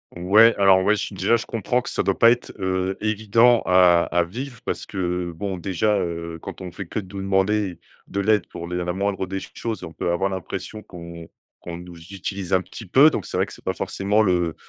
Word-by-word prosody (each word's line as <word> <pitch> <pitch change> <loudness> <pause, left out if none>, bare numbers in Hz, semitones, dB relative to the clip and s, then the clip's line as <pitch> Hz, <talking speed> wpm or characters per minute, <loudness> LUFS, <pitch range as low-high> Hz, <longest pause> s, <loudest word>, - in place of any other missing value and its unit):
Ouais, 105 +6 +5
alors 95 -1 +5
ouais 105 - +4
ch 105 - -4
déjà 100 +4 +2
je 115 - -2
comprends 120 +3 -1
que - - -6
ça - - -1
doit - - 0
pas 115 0 +7
être, 120 - -2
heu, 95 0 -1
évident 110 +3 +3
à 90 -2 +5
à 85 0 +2
vivre 120 +7 -7
parce - - -3
que 90 -2 -3
bon, 95 0 -4
déjà, 100 +4 0
heu, 85 -2 -4
quand - - -8
on 90 -2 -6
fait 100 - -7
que 110 - -4
de 95 -1 -10
nous 100 - -4
demander 95 -1 +1 0.3
de 100 - -2
l'aide 105 -2 +2
pour 85 0 -8
les 90 - -2
la 90 0 -2
moindre 95 -1 -2
des 95 +1 -4
choses, 110 -5 -6
on 80 - -7
peut 85 - -3
avoir 95 +3 0
l'impression 95 +3 -6
qu'on 85 -3 -10 0.3
qu'on 85 - -7
nous 90 0 -11 0.2
utilise 95 0 -4
un 95 - +4
petit - - -10
peu. 135 - +6
Donc - - -4
c'est - - -6
vrai - - +2
que - - -12
c'est - - -15
pas - - 0
forcément 100 +2 0
le 90 -5 +1
95 Hz, 230 wpm, -23 LUFS, 90-105 Hz, 0.3 s, pas